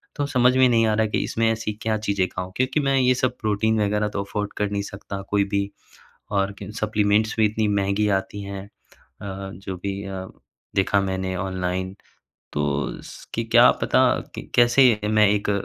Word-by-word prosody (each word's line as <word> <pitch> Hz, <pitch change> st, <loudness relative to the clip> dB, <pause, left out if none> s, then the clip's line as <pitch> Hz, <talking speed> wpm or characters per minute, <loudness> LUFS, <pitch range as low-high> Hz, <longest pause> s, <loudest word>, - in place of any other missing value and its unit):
तो 145 Hz, -, -1 dB
समझ 125 Hz, -1 st, +3 dB
में 130 Hz, 0 st, +6 dB
नहीं 115 Hz, -1 st, +3 dB
आ 110 Hz, -, +2 dB
रहा 110 Hz, +1 st, +2 dB
है 110 Hz, -, -1 dB
कि -, -, +1 dB
इसमें 115 Hz, 0 st, 0 dB
ऐसी 110 Hz, -1 st, -3 dB
क्या 110 Hz, -1 st, 0 dB
चीज़ें 100 Hz, -2 st, +1 dB
खाऊँ 90 Hz, 0 st, -6 dB
क्योंकि 130 Hz, +4 st, +1 dB
मैं 135 Hz, -2 st, +2 dB
ये 130 Hz, 0 st, +4 dB
सब 125 Hz, 0 st, -1 dB
प्रोटीन 110 Hz, +1 st, +1 dB
वग़ैरह 105 Hz, +1 st, +1 dB
तो 100 Hz, -, -1 dB
अफ़ोर्ड 105 Hz, +1 st, -4 dB
कर 105 Hz, -1 st, 0 dB
नहीं 100 Hz, 0 st, -1 dB
सकता 100 Hz, 0 st, -7 dB
कोई 100 Hz, -1 st, +2 dB
भी 100 Hz, 0 st, 0 dB, 0.6 s
और 100 Hz, -1 st, 0 dB
क 100 Hz, -, -8 dB
सप्लीमेंट्स 110 Hz, 0 st, +1 dB
भी 110 Hz, -, +4 dB
इतनी 110 Hz, +1 st, 0 dB
महँगी 100 Hz, +1 st, +1 dB
आती 100 Hz, +1 st, -8 dB
हैं 100 Hz, -1 st, -6 dB
अ, -, -, -18 dB, 0.5 s
जो 95 Hz, -1 st, -6 dB
भी 100 Hz, 0 st, -3 dB
अ, 95 Hz, -1 st, -6 dB, 0.5 s
देखा 100 Hz, +1 st, +2 dB
मैंने 95 Hz, -1 st, -2 dB
ऑनलाइन 95 Hz, 0 st, -3 dB, 0.6 s
तो 75 Hz, -1 st, -2 dB
स -, -, -12 dB
कि -, -, -1 dB
क्या -, -, +6 dB
पता -, -, +3 dB, 0.4 s
क -, -, -8 dB
कैसे 120 Hz, -2 st, +5 dB
मैं 105 Hz, -1 st, +4 dB
एक 105 Hz, 0 st, 0 dB
105 Hz, 190 wpm, -23 LUFS, 95-110 Hz, 0.6 s, में